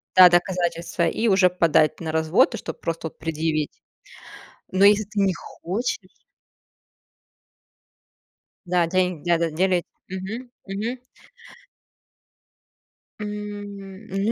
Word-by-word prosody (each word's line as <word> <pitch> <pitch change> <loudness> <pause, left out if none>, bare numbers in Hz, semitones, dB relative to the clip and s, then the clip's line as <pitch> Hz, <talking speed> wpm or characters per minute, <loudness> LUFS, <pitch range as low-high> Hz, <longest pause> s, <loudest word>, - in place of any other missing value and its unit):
да, 185 -1 +10
доказательства, 175 -1 +1
и 225 +7 0
уже 190 -3 +5
подать 165 -3 +3
на 160 -2 -3
развод, 160 +2 +3
и - - -4
чтоб - - -7
просто 165 0 -3
вот - - -13
предъявить. 155 -1 -1 1.0
Но 190 +1 +2
если 205 +1 +5
ты 210 +1 -4
не 195 -1 +3
хочешь 190 +4 -4 2.6
Да, 175 -1 +3
деньги, 180 -2 0
да-да, 170 -1 +3
делить, 180 +2 +1 0.2
мгм, 205 +7 -6 0.2
мгм. 215 +6 -3 2.2
М, 205 -1 -7
ну, 195 +3 0
185 Hz, 105 wpm, -24 LUFS, 170-205 Hz, 2.6 s, да